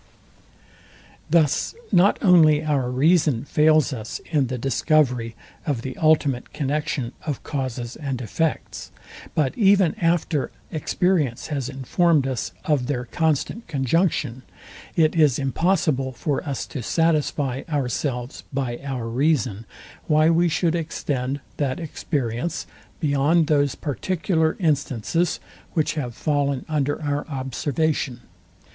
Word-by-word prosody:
Thus 155 Hz, -, +2 dB, 0.2 s
not 190 Hz, +1 st, +5 dB
only 155 Hz, -5 st, +6 dB
our 140 Hz, -5 st, +1 dB
reason 145 Hz, -1 st, +2 dB
fails 155 Hz, 0 st, +3 dB
us 110 Hz, -3 st, -5 dB
in 145 Hz, -5 st, +2 dB
the 130 Hz, +1 st, -3 dB
discovery 125 Hz, -3 st, +1 dB, 0.3 s
of 130 Hz, -6 st, -1 dB
the 130 Hz, -1 st, -5 dB
ultimate 150 Hz, -5 st, +2 dB
connexion 145 Hz, -4 st, -2 dB
of 145 Hz, -5 st, -4 dB
causes 130 Hz, -4 st, -4 dB
and 135 Hz, -4 st, -4 dB
effects, 145 Hz, +7 st, -2 dB, 0.5 s
but 150 Hz, -4 st, +1 dB
even 195 Hz, -5 st, +4 dB
after 165 Hz, -5 st, +1 dB, 0.2 s
experience 155 Hz, -5 st, 0 dB
has 135 Hz, -3 st, -2 dB
informed 140 Hz, +3 st, +2 dB
us 130 Hz, -3 st, -3 dB
of 145 Hz, -7 st, +1 dB
their 125 Hz, -4 st, -2 dB
constant 160 Hz, -, -1 dB
conjunction, 140 Hz, -3 st, 0 dB, 0.5 s
it 160 Hz, -1 st, +3 dB
is 150 Hz, -6 st, +4 dB
impossible 140 Hz, -2 st, +1 dB
for 140 Hz, +3 st, -2 dB
us 135 Hz, -, -3 dB
to 135 Hz, -, -6 dB
satisfy 145 Hz, -2 st, 0 dB
ourselves 130 Hz, -3 st, -2 dB
by 130 Hz, -3 st, -2 dB
our 130 Hz, -4 st, -3 dB
reason, 120 Hz, -4 st, 0 dB, 0.4 s
why 155 Hz, +1 st, +4 dB
we 170 Hz, +1 st, +3 dB
should 165 Hz, +1 st, +1 dB
extend 145 Hz, -5 st, -2 dB, 0.2 s
that 135 Hz, -1 st, -1 dB
experience 145 Hz, -2 st, -3 dB, 0.3 s
beyond 150 Hz, +2 st, +3 dB
those 145 Hz, -3 st, +2 dB
particular 160 Hz, +1 st, -1 dB
instances, 155 Hz, -, 0 dB, 0.3 s
which 155 Hz, -3 st, +1 dB
have 125 Hz, -7 st, -4 dB
fallen 140 Hz, -3 st, 0 dB
under 145 Hz, -2 st, 0 dB
our 145 Hz, 0 st, -2 dB
observation. 135 Hz, -1 st, -2 dB
145 Hz, 115 wpm, -23 LUFS, 130-160 Hz, 0.5 s, only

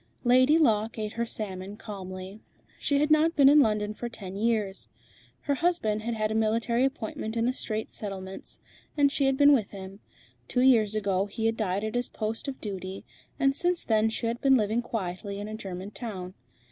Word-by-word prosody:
Lady 255 Hz, +5 st, +5 dB
Locke 225 Hz, -8 st, +2 dB
ate 215 Hz, -1 st, -3 dB
her 235 Hz, 0 st, -2 dB
salmon 200 Hz, -2 st, -5 dB
calmly. 190 Hz, -1 st, -8 dB, 0.4 s
She 285 Hz, -, +1 dB
had 300 Hz, +1 st, +1 dB
not 315 Hz, +2 st, +4 dB
been 280 Hz, -2 st, +6 dB
in 295 Hz, +2 st, +8 dB
London 210 Hz, -4 st, +2 dB
for 240 Hz, +2 st, -5 dB
ten 195 Hz, -5 st, -8 dB
years. 210 Hz, -2 st, -1 dB, 0.5 s
Her 285 Hz, -, 0 dB
husband 275 Hz, -10 st, 0 dB
had 235 Hz, +1 st, -3 dB
had 215 Hz, -1 st, -1 dB
a -, -, 0 dB
military 225 Hz, +2 st, +1 dB
appointment 270 Hz, -4 st, -4 dB
in 230 Hz, -, +1 dB
the 250 Hz, -, +1 dB
Straits 220 Hz, -4 st, -4 dB
Settlements, 190 Hz, -2 st, -7 dB, 0.4 s
and 285 Hz, -1 st, +4 dB
she 280 Hz, -, +1 dB
had 270 Hz, 0 st, +2 dB
been 285 Hz, +1 st, +7 dB
with 225 Hz, -8 st, +1 dB
him. 195 Hz, 0 st, -9 dB, 0.5 s
Two 250 Hz, -, +1 dB
years 225 Hz, -5 st, +4 dB
ago 200 Hz, -2 st, 0 dB
he 220 Hz, +2 st, -4 dB
had 225 Hz, 0 st, +2 dB
died 200 Hz, -2 st, -1 dB
at 220 Hz, -, -3 dB
his 245 Hz, 0 st, -1 dB
post 220 Hz, +4 st, -4 dB
of 270 Hz, -1 st, -5 dB
duty, 190 Hz, -2 st, -6 dB, 0.3 s
and 275 Hz, 0 st, +3 dB
since 350 Hz, +3 st, 0 dB
then 220 Hz, 0 st, +2 dB
she 225 Hz, +2 st, -3 dB
had 235 Hz, +1 st, -2 dB
been 270 Hz, -1 st, +5 dB
living 220 Hz, +1 st, +1 dB
quietly 200 Hz, -3 st, -4 dB
in 205 Hz, +1 st, -5 dB
a 215 Hz, -, -6 dB
German 195 Hz, -2 st, -6 dB
town. 190 Hz, -6 st, -6 dB
220 Hz, 195 wpm, -28 LUFS, 200-255 Hz, 0.5 s, in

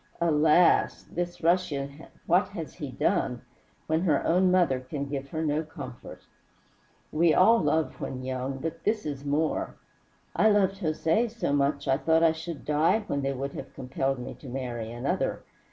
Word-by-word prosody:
Alas! 160 Hz, +1 st, +4 dB
this 175 Hz, 0 st, -4 dB
Russian, 155 Hz, -4 st, 0 dB, 0.2 s
what -, -, +3 dB
has -, -, -7 dB
he -, -, -6 dB
done, -, -, 0 dB, 0.4 s
when 160 Hz, +1 st, +1 dB
her 155 Hz, -6 st, +1 dB
own 180 Hz, +2 st, +3 dB
mother 175 Hz, -8 st, +3 dB
can 140 Hz, +2 st, -5 dB
give 140 Hz, -1 st, -5 dB
her 160 Hz, +2 st, -3 dB
no 150 Hz, +1 st, +1 dB
comfort? 155 Hz, -, -9 dB, 0.9 s
We 165 Hz, +1 st, +3 dB
all 225 Hz, +5 st, +6 dB
love 155 Hz, +1 st, 0 dB
when 130 Hz, -1 st, -5 dB
young, 130 Hz, +1 st, -3 dB
but 165 Hz, +4 st, -5 dB
this 215 Hz, 0 st, 0 dB
is 140 Hz, -2 st, -4 dB
more. 150 Hz, +2 st, -1 dB, 0.6 s
I 220 Hz, -, +5 dB
loved 195 Hz, -2 st, +2 dB
Jose 165 Hz, +6 st, +1 dB
so 230 Hz, -10 st, -2 dB
much 140 Hz, 0 st, +1 dB
I 135 Hz, 0 st, +3 dB
thought 160 Hz, +2 st, +2 dB
I 165 Hz, -, +6 dB
should 160 Hz, -2 st, -7 dB
die 155 Hz, +9 st, +2 dB
when 140 Hz, -8 st, -2 dB
they 135 Hz, 0 st, -1 dB
would 135 Hz, +1 st, -4 dB
have 135 Hz, +1 st, -8 dB
compelled 135 Hz, +1 st, -2 dB
me 125 Hz, -, -6 dB
to 135 Hz, -, -10 dB
marry 120 Hz, -3 st, -4 dB
another. 120 Hz, +3 st, -2 dB
150 Hz, 170 wpm, -27 LUFS, 135-170 Hz, 0.9 s, all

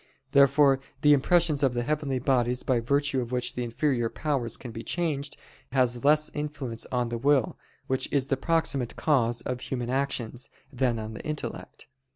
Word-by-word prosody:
Therefore 140 Hz, -1 st, +5 dB, 0.2 s
the 150 Hz, 0 st, +6 dB
impressions 155 Hz, +1 st, +3 dB
of 130 Hz, -3 st, +2 dB
the 120 Hz, -, 0 dB
heavenly 145 Hz, 0 st, -1 dB
bodies, 125 Hz, -1 st, +1 dB
by 125 Hz, -3 st, +1 dB
virtue 140 Hz, +2 st, +1 dB
of 120 Hz, 0 st, -6 dB
which 125 Hz, -1 st, -1 dB
the 125 Hz, -, -3 dB
inferior 120 Hz, 0 st, 0 dB
powers 135 Hz, -7 st, -2 dB
can 120 Hz, -, -8 dB
be 115 Hz, 0 st, -7 dB
changed, 150 Hz, -4 st, -2 dB, 0.4 s
has 125 Hz, -2 st, +1 dB
less 150 Hz, +1 st, +3 dB
influence 145 Hz, -6 st, -5 dB
on 125 Hz, -2 st, 0 dB
the 120 Hz, 0 st, -3 dB
will, 140 Hz, -2 st, +2 dB, 0.3 s
which 130 Hz, 0 st, -1 dB
is 140 Hz, -3 st, +2 dB
the 135 Hz, -, 0 dB
proximate 140 Hz, -4 st, 0 dB
cause 120 Hz, -6 st, +1 dB
of 125 Hz, -1 st, -3 dB
human 125 Hz, -2 st, -3 dB
actions, 130 Hz, -2 st, -2 dB, 0.2 s
than 125 Hz, -2 st, +1 dB
on 110 Hz, 0 st, -6 dB
the -, -, -7 dB
intellect. 150 Hz, -1 st, -6 dB
130 Hz, 175 wpm, -27 LUFS, 120-145 Hz, 0.4 s, the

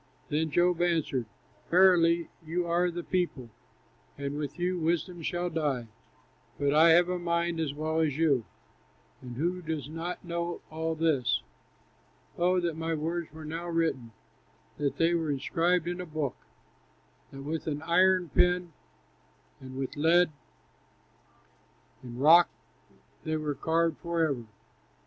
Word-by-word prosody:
Then 155 Hz, +2 st, 0 dB
Job 175 Hz, +2 st, +2 dB
answered: 160 Hz, -8 st, 0 dB, 0.4 s
"Verily 170 Hz, -2 st, +4 dB
you 170 Hz, +3 st, -2 dB
are 175 Hz, +1 st, +2 dB
the 175 Hz, 0 st, -5 dB
people, 165 Hz, -11 st, -2 dB, 0.7 s
And 140 Hz, 0 st, -4 dB
with 145 Hz, 0 st, -4 dB
you 180 Hz, 0 st, -1 dB
wisdom 170 Hz, +1 st, -1 dB
shall 175 Hz, +2 st, -2 dB
die! 140 Hz, -8 st, -1 dB, 0.7 s
But 140 Hz, 0 st, +2 dB
I 160 Hz, +2 st, +6 dB
have 175 Hz, +2 st, +6 dB
a 180 Hz, 0 st, -2 dB
mind 170 Hz, -1 st, -1 dB
as 150 Hz, -3 st, -2 dB
well 155 Hz, +1 st, -1 dB
as 155 Hz, -3 st, +1 dB
you, 145 Hz, -7 st, +3 dB, 0.8 s
And 125 Hz, -2 st, -8 dB
who 175 Hz, +5 st, -1 dB
does 160 Hz, -4 st, -4 dB
not 165 Hz, +3 st, -5 dB
know 170 Hz, 0 st, -3 dB
all 160 Hz, +1 st, -2 dB
this? 155 Hz, -6 st, +1 dB, 0.9 s
Oh, 180 Hz, +1 st, +2 dB
that 170 Hz, -2 st, -1 dB
my 160 Hz, 0 st, -2 dB
words 165 Hz, +2 st, -3 dB
were 155 Hz, +1 st, -10 dB
now 165 Hz, +3 st, -5 dB
written, 160 Hz, -9 st, -1 dB, 0.7 s
That 140 Hz, -2 st, -1 dB
they 165 Hz, +1 st, +3 dB
were 165 Hz, -2 st, 0 dB
inscribed 165 Hz, +5 st, +1 dB
in 175 Hz, +1 st, -3 dB
a 180 Hz, -, -7 dB
book, 150 Hz, -5 st, -3 dB, 1.0 s
That 135 Hz, 0 st, -9 dB
with 160 Hz, +3 st, -4 dB
an 150 Hz, 0 st, -3 dB
iron 180 Hz, +1 st, +3 dB
pen 180 Hz, +1 st, +2 dB, 0.9 s
and 130 Hz, 0 st, -9 dB
with 135 Hz, -1 st, -4 dB
lead 165 Hz, +3 st, +4 dB, 1.7 s
In 120 Hz, -1 st, -8 dB
rock 165 Hz, +6 st, +7 dB, 0.7 s
they 155 Hz, 0 st, -1 dB
were 150 Hz, -1 st, -2 dB
carved 165 Hz, +1 st, 0 dB
forever! 160 Hz, -8 st, -1 dB
165 Hz, 140 wpm, -29 LUFS, 150-175 Hz, 1.7 s, rock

